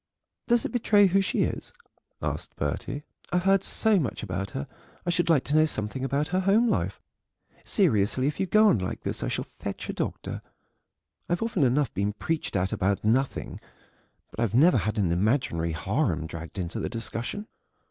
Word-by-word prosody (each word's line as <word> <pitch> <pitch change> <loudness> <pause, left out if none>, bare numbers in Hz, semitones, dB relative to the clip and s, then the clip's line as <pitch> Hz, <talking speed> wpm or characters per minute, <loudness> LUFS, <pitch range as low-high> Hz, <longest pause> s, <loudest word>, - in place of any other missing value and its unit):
"Does 240 -1 +3
it - - -2
betray 215 -4 +4
who 195 +1 +3
she 190 - +1
is?" - - -4 0.5
asked - - -4
Bertie; 145 +1 -3 0.3
"I've 180 0 +1
heard 195 0 +4
so 220 -3 +3
much 115 -9 -3
about 95 -1 -3
her, 70 - -5 0.4
I 175 - +1
should 175 0 +1
like 155 -6 +4
to 145 - -1
know 155 0 +6
something 110 -3 -3
about 140 +3 0
her 185 - +1
home 200 +5 +3
life. 95 - 0 0.6
Seriously, 105 +5 +2
if 145 - -1
you 190 - 0
go 215 +3 +5
on 110 - +3
like 95 - -4
this - - -3
I - - -1
shall - - -2
fetch - - -7
a - - -1
doctor; - - -4 0.9
I've 175 +4 0
often 225 -7 -1
enough 135 +2 +2
been 100 +1 -1
preached 160 +6 -3
at 95 0 0
about 100 +1 0
nothing, 125 +5 0 0.7
but - - -10
I've 115 -1 0
never 160 +8 +6
had 110 +1 -1
an 95 -5 +2
imaginary 85 - +1
harem 80 +1 0
dragged 80 +3 -8
into 90 -2 -3
the - - -2
discussion." 115 - -4
130 Hz, 185 wpm, -27 LUFS, -, 0.9 s, know